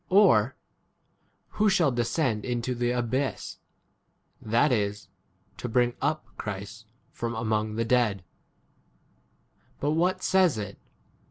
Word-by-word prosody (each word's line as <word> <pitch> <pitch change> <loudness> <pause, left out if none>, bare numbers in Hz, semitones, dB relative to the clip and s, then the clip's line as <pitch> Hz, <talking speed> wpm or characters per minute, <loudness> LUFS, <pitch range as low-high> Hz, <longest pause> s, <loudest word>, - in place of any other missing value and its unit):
Or, 150 - +5 0.9
Who 215 0 +2
shall 170 -7 +3
descend 120 -1 0
into 120 0 -2
the 120 0 -1
abyss? 125 +3 -2 0.8
That 120 +7 +2
is, 105 -4 -1 0.5
to 120 - -5
bring 120 +1 +2
up 155 +2 0
Christ 105 +2 -6 0.2
from 115 0 -4
among 110 -1 -1
8 - - -6
[the] 115 +1 0
dead. 110 -5 +2 1.6
But 145 - 0
what 175 +4 +1
says 185 -8 +3
it 100 -2 -6
120 Hz, 115 wpm, -27 LUFS, 110-140 Hz, 1.6 s, Or